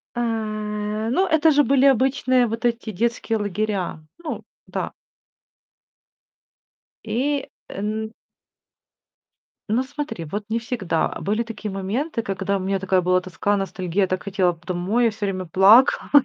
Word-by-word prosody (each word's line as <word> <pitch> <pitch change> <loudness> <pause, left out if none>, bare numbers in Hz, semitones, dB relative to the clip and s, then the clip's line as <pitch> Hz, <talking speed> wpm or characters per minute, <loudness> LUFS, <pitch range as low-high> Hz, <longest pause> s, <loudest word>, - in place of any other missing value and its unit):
А, 240 - 0 0.9
ну 375 +8 +2
это 315 0 +4
же 290 -1 +4
были 275 0 +3
обычные 255 -1 +3
вот 225 +2 -4
эти 235 -2 0
детские 225 +2 -1
лагеря. 205 -4 -2 0.2
Ну 335 -3 -5 0.2
да. - - -4 2.1
И 275 +3 -1 0.2
эн 215 +2 -3 1.6
Ну 240 +4 +3
смотри, 260 - -5
вот 205 +7 -4
не 225 +1 0
всегда. 225 -8 -1
Были 215 +4 0
такие 225 -2 -6
моменты, 225 - -2
когда 195 0 -1
у - - -2
меня 195 +1 0
такая 185 -1 +1
была 185 +1 +3
тоска, 185 +3 -1
ностальгия, 190 0 -1
я - - +1
так 185 0 -2
хотела 190 -3 +1
п 165 - -16
домой, 185 +7 +1
я 230 - +4
всё 210 -1 -4
время 185 -1 -2
плакала. 195 +9 +5
215 Hz, 140 wpm, -23 LUFS, 190-245 Hz, 2.1 s, плакала